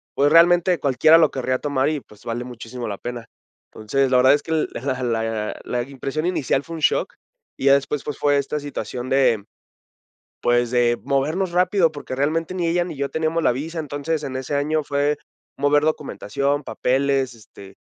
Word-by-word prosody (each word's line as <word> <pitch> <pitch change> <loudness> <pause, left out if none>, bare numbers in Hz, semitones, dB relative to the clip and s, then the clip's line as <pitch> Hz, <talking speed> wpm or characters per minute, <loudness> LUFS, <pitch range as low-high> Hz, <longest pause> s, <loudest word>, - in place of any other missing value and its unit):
pues, 145 +2 +3
realmente, 175 +1 +5
cualquiera 140 +4 +5
lo 160 -3 +5
querría 130 -1 -1
tomar 140 -1 0
y, 155 -2 -2
pues, 105 -2 -19
vale 120 +1 -3
muchísimo 120 0 -7
la 100 - -4
pena. 120 +1 -6 0.5
Entonces, 130 +5 0
la 125 - +5
verdad 130 +2 +6
es 145 - +1
que 160 - -7 0.2
la - - -4 0.2
la 115 -2 -2
la 120 -1 -2
impresión 140 +3 -4
inicial 155 -6 0
fue 165 +2 -8
un - - -8
shock - - +1 0.4
y - - -4
ya 140 - +7
después, 140 +1 -2
pues, 150 - -5
fue 145 -1 +2
esta 140 +2 -2
situación 130 -3 -5
de, 125 -6 +3 1.0
pues, 120 0 +2
de 120 -1 +2
movernos 155 +7 0
rápido, 180 -2 +3
porque 145 -3 -6
realmente, 160 +6 -1
ni 175 -2 -1
ella 175 +1 +1
ni 165 -5 -7
yo 140 0 -2
teníamos 160 +1 -1
la 125 - +3
visa. 160 +6 -5
Entonces, 150 +1 -3
en 130 -1 -4
ese 130 +2 -4
año 155 +2 0
fue 145 +1 0 0.4
mover 145 +1 +3
documentación, 140 0 -1
papeles, 135 0 0
este, 100 -3 -15
140 Hz, 185 wpm, -22 LUFS, 125-155 Hz, 1.0 s, ya